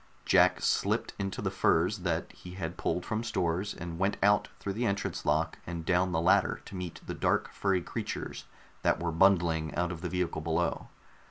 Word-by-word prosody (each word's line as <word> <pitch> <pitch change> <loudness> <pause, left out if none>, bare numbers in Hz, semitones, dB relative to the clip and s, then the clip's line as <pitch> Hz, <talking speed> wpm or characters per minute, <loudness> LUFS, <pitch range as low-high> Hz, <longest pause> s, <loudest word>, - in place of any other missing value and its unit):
Jack - - +5
slipped - - +1
into 95 -1 -3
the - - 0
furs 90 +6 +2
that 85 -3 -2
he 90 - -11
had 85 -2 -4
pulled 90 - -1
from 110 +1 -2
stores, 90 -2 -1
and 85 -1 -6
went 95 +2 +1
out 105 +1 +4
through 100 - -3
the 120 +4 0
entrance 100 0 -2
lock 80 +2 +1
and 85 -1 -5
down 90 +1 +2
the 80 - +1
ladder 95 +3 +3
to - - -9
meet 90 -3 -5
the - - -4
dark - - 0
furry 95 -3 0
creatures - - -5 0.4
that - - +2
were 85 -1 -1
bundling 85 -3 +3
out 90 +2 0
of 85 -2 -6
the - - -3
vehicle 90 -3 -1
below. 80 +2 -1
90 Hz, 190 wpm, -30 LUFS, 85-95 Hz, 0.4 s, Jack